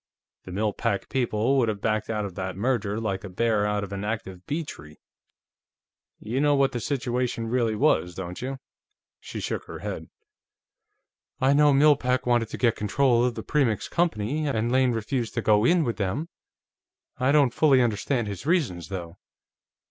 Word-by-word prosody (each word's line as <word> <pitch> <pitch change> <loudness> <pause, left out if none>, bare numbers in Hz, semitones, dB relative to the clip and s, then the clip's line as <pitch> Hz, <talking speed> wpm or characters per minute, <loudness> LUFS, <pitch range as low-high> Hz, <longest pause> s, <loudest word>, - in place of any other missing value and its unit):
The 95 - -8
Mill 105 +2 0
Pack 100 -4 -2
people 125 +1 +1
would 115 -3 +2
have 105 -2 -3
backed 110 +1 -1
out 105 -2 -1
of 100 - -6
that 95 0 -5
merger 110 -2 0
like 100 -4 -3
a 100 - -7
bear 105 +2 +1
out 105 0 -1
of 100 0 -6
an 100 0 -4
active 95 -4 -5
bee 160 +3 -1
tree.... 75 - -11 1.2
You 125 +5 -2
know 145 -1 +4
what 140 -1 +3
the 120 - -3
situation 125 -2 -2
really 115 -2 +1
was, 105 - +2
don't 90 -1 -6
you?" 135 +2 -4 0.6
She - - -7
shook - - -3
her - - -8
head. - - -6 1.3
"I 135 0 +4
know 145 0 +5
Mill 145 +2 +6
Pack 125 -1 0
wanted 120 -2 +2
to - - -6
get 120 -3 +2
control 120 +3 +2
of 125 -1 0
the - - -5
Premix 130 -8 0
Company, 155 -3 0
and 115 -3 0
Lane 130 -1 +3
refused 115 +1 -2
to 115 - 0
go 105 -1 +4
in 175 +4 +4
with 120 -5 -2
them. 105 - -2 0.9
I 130 +2 +3
don't 140 -5 +4
fully 140 -4 +4
understand 120 +1 0
his 100 - -6
reasons, 120 - 0
though." 90 -2 -6
115 Hz, 180 wpm, -26 LUFS, 105-135 Hz, 1.3 s, Mill